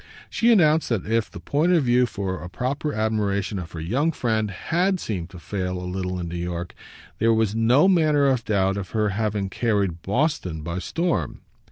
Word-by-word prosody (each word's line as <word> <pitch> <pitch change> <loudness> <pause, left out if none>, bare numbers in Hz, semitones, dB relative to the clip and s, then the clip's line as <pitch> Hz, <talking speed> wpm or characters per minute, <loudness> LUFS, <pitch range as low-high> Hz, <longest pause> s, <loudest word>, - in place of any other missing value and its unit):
She 235 +1 +3
announced 160 -7 +4
that 115 -6 -1
if 115 0 0
the - - -9
point 150 - +1
of 165 -4 +4
view 125 0 +3
for 95 -4 -4
a 90 - -7
proper 130 - -2
admiration 105 -3 -1
of 85 -2 -8
her 80 - -6
young 130 - 0
friend 110 -7 -1
HAD 180 - 0
seemed 90 - -4
to 95 - -11
fail 90 0 -3
a 90 - -6
little 90 0 -3
in 85 - -4
New 85 +1 -5
York, 85 0 -4 0.5
there 115 +1 +4
was 110 -2 +1
no 120 +9 +4
manner 155 -6 +3
of 130 -4 +2
doubt 100 -2 +1
of 95 -2 -5
her 105 -1 +2
having 105 -1 -1
carried 100 -5 -1
Boston 100 - -1
by 85 +3 -3
storm. 165 - -2
105 Hz, 195 wpm, -24 LUFS, 90-135 Hz, 0.5 s, announced